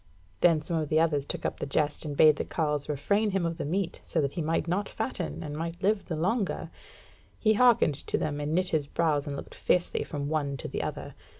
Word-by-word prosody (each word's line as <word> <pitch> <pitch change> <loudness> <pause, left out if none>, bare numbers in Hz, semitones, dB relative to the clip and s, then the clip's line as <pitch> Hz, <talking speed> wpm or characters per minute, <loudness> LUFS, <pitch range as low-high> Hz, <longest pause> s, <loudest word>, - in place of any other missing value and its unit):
Then 165 -3 +4
some 165 +1 -2
of 155 -2 -2
the 155 - +3
others 150 -4 +1
took - - -4
up - - -2
the - - -3
jest, 150 +2 0
and 145 -2 -4
bade 155 -1 +7
the - - -1
carle 150 -3 -1
refrain 200 +10 +1
him 195 -3 0
of 165 0 -3
the - - -2
meat, 180 +3 -2
so 165 - -1
that 140 -2 0
he 170 - -3
might 160 +1 0
not 195 +4 -1
fatten, 80 - -4
and 145 - -5
might 165 +3 -5
live 205 +1 +2
the 165 - -3
longer. 190 +6 -1 0.7
He 215 -1 +3
hearkened 235 -8 +5
to - - +1
them, 145 -1 -2
and 150 +2 -1
knit 185 0 +1
his 150 -3 0
brows 150 -2 0
and 140 - -3
looked - - -8
fiercely 180 - +1
from 145 -3 -4
one 145 -2 -1
to - - -6
the - - -3
other. - - -5
160 Hz, 235 wpm, -28 LUFS, 145-180 Hz, 0.7 s, bade